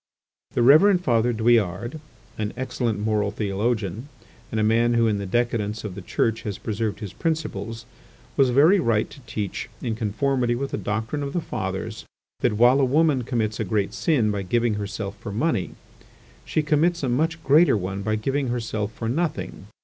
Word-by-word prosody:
The 120 - +3
Reverend 180 +8 +6
Father 120 -4 +2
Douillard, 115 - +1 0.4
an 105 -1 -3
excellent 125 -4 -2
moral 105 -1 0
theologian, 105 - -2 0.4
and 110 - -2
a - - +2
man 115 +2 +3
who 115 0 +4
in 105 -2 +1
the 100 - -4
decadence 110 -1 -1
of 105 -4 -5
the 100 - -8
Church 115 +5 0
has 105 -2 -4
preserved 110 -1 -3
his 105 -4 -6
principles, 115 - -3 0.5
was 135 -2 +4
very 155 +10 +5
right 115 -9 +1
to - - -12
teach, 105 -4 -4
in 115 - -2
conformity 120 +3 0
with 135 +3 -3
the - - -2
doctrine 110 +8 -2
of 140 0 -4
the 175 - +1
Fathers, 160 - -4 0.4
that 120 - +1
while 125 +4 +5
a - - +3
woman 145 +1 +3
commits 110 -3 -1
a - - +1
great 100 0 -1
sin 125 -11 +1
by 100 -1 -2
giving 115 +4 +1
herself 100 -1 -4
for 105 - -6
money, 110 - -1 0.7
she 155 - 0
commits 160 +2 +2
a - - +1
much 160 +6 0
greater 150 -3 +5
one 95 +1 -4
by 110 +2 0
giving 135 +5 -1
herself 115 -3 -2
for 115 0 -5
nothing. 160 +8 -2
115 Hz, 180 wpm, -24 LUFS, 105-135 Hz, 0.7 s, Reverend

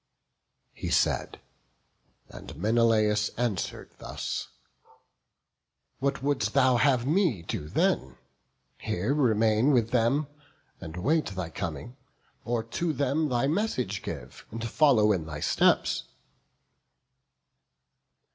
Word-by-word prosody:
He - - -5
said: - - +1 0.9
and - - -11
Menelaus 110 0 +2
answer'd 115 -6 -3
thus: - - -4 1.5
"What 140 0 -1
wouldst 140 -1 0
thou 130 -2 +4
have 125 -1 +3
me 155 - +1
do 75 -2 -5
then? 65 -4 0 0.6
here 105 +10 -1
remain 115 -3 +3
With 120 -5 +2
them, 125 +5 +2 0.5
and 80 -2 -8
wait 150 - +1
thy 95 -4 -5
coming, 80 - -6 0.5
or 120 -1 -1
to 160 +8 -2
them 145 +2 0
Thy 120 0 +1
message 140 - -1
give, 60 +1 -8
and 115 +1 -5
follow 115 -5 +4
in 85 -6 -1
thy 75 -2 -6
steps?" - - +2
115 Hz, 105 wpm, -27 LUFS, 100-140 Hz, 1.5 s, thou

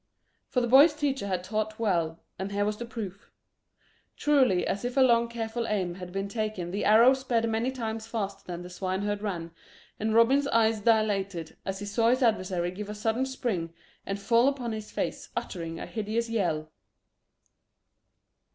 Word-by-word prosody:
For 250 - 0
the 240 - 0
boy's 285 +6 +7
teacher 275 -7 -1
had 185 -2 -1
taught 215 +2 -2
well, 170 -7 0 0.2
and 190 +1 -3
here 205 0 0
was 210 0 -1
the 235 - -6
proof. 210 -3 -7 0.9
Truly 260 -11 +3
as 200 - -2
if 245 +2 -3
a - - +6
long 235 -2 +5
careful 230 0 -3
aim 190 -5 -1
had 180 0 -8
been 195 +1 -2
taken 205 -4 -3
the 200 - -2
arrow 230 +5 +7
sped 245 -4 0
many 225 +3 0
times 225 -4 -4
faster 200 -4 -4
than 175 -1 -6
the 180 - -9
swineherd 195 +3 -2
ran, 175 -6 -4 0.5
and 220 +1 0
Robin's 265 +5 +5
eyes 225 -3 +3
dilated 200 -6 +1
as 195 0 -3
he 205 - -6
saw 225 +3 +2
his 255 +2 +2
adversary 185 -6 +1
give 205 +3 -7
a 210 - -5
sudden 225 +5 0
spring 190 -11 -3 0.3
and 195 0 -4
fall 230 +5 +3
upon 260 -4 -1
his 215 -1 -5
face, - - -3
uttering 165 -3 -4
a - - -5
hideous 225 +1 -2
yell. 160 -8 -1
215 Hz, 175 wpm, -28 LUFS, 190-235 Hz, 0.9 s, boy's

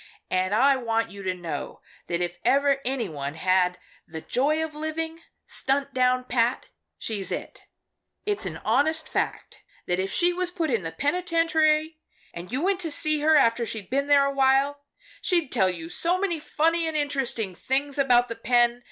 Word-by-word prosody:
And 185 +2 +1
I 270 +4 +4
want 230 -2 -1
you 200 0 -9
to 185 -1 -1
know 165 -5 -6 0.3
that 170 0 -1
if 175 0 -3
ever 280 0 +3
any 255 -3 -2
one 145 -3 -5
had 180 +1 +2 0.3
the 160 0 -7
joy 300 - +1
of 315 - -10
living 320 +2 -4 0.2
stunt 275 +1 -1
down 255 0 +2
pat, 245 0 0 0.3
she's 205 -4 -2
it. - - -6 0.6
It's 415 -1 -1
an - - -5
honest 315 +2 +2
fact - - -3 0.2
that 180 +1 -1
if 190 +1 -1
she 350 0 +3
was 365 0 -1
put 335 -5 -2
in 230 -4 +1
the 165 -2 -5
penitentiary 320 - +1 0.3
and 175 +3 -8
you 265 +5 -2
went 385 0 +1
to 340 -3 -3
see 305 0 +1
her 310 +1 +4
after 235 -4 +4
she'd 220 -3 -5
been 280 +2 0
there 285 -1 +5
awhile, 275 +1 +2 0.4
she'd 340 -7 +1
tell 190 -1 +3
you 165 -3 -5
so 345 - +1
many 360 -5 -1
funny 325 +2 +1
and 315 -1 -2
interesting 265 -9 -1
things 275 +8 -1
about 245 -3 +4
the 230 - -5
pen. 240 +1 +2
270 Hz, 180 wpm, -25 LUFS, 220-310 Hz, 0.6 s, there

